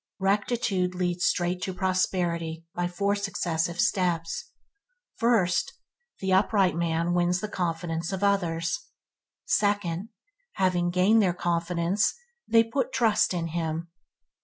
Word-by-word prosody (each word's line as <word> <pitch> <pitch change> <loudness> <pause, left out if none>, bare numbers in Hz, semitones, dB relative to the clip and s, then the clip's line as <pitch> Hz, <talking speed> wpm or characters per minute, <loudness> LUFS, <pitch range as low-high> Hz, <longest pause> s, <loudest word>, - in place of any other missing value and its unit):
Rectitude 195 -2 0
leads 180 0 0
straight 180 0 0
to 190 -1 -3
prosperity 175 -3 -1
by 175 0 -1
four 200 +3 0
successive 175 -4 -2
steps. 175 -6 0 0.7
First, 220 -7 +2 0.5
the 190 -1 0
upright 190 -3 +3
man 170 0 0
wins 175 +1 +2
the 215 - -3
confidence 170 -2 -2
of 190 +1 -3
others. 170 -5 +1 0.7
Second, 205 -2 0 0.4
having 180 -2 +1
gained 190 +5 +4
their 180 -4 +1
confidence, 175 +3 0 0.3
they 225 0 +5
put 235 +3 -2
trust 225 -3 +2
in 170 -2 -2
him. 165 0 -3
180 Hz, 115 wpm, -27 LUFS, 170-200 Hz, 0.7 s, they